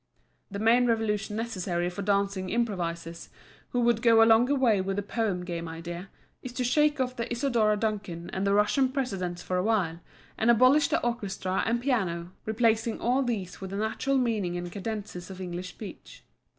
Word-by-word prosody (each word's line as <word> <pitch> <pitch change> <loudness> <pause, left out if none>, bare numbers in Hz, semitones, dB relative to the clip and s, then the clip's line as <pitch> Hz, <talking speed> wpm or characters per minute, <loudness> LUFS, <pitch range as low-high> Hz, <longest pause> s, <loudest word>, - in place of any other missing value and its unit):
The 200 - -5
main 235 +4 +4
revolution 215 -2 0
necessary 185 -6 -2
for 180 - -5
dancing 200 -1 0
improvisers, 170 -7 -2 0.4
who 245 - 0
would 235 -1 +2
go 230 -2 +6
a - - +6
longer 235 +5 +5
way 235 -7 +3
with 195 +1 -2
the 205 - -2
Poem 205 -4 -2
Game 170 -1 -4
idea, 170 +3 -7 0.3
is 255 - -7
to 250 - -2
shake 295 +4 +2
off 255 -1 -1
the 235 -1 -4
Isadora 235 -4 +2
Duncan 200 -6 -3
and 190 +1 -1
the 200 - +3
Russian 230 +6 +3
precedents 195 -10 -3
for 185 - -1
a 180 - +1
while, 190 -7 +1 0.4
and 225 - +2
abolish 255 +5 +6
the - - +1
orchestra 195 -5 -1
and 235 +1 +1
piano, 180 -10 -1
replacing 225 0 +1
all 250 +3 +2
these 210 -9 -3
with 190 - -5
the 195 - -4
natural 220 +6 0
meaning 215 -8 0
and 175 0 -5
cadences 200 -3 -5
of 190 -1 -9
English 180 0 -5
speech. 210 +1 -11
210 Hz, 180 wpm, -28 LUFS, 185-235 Hz, 0.4 s, go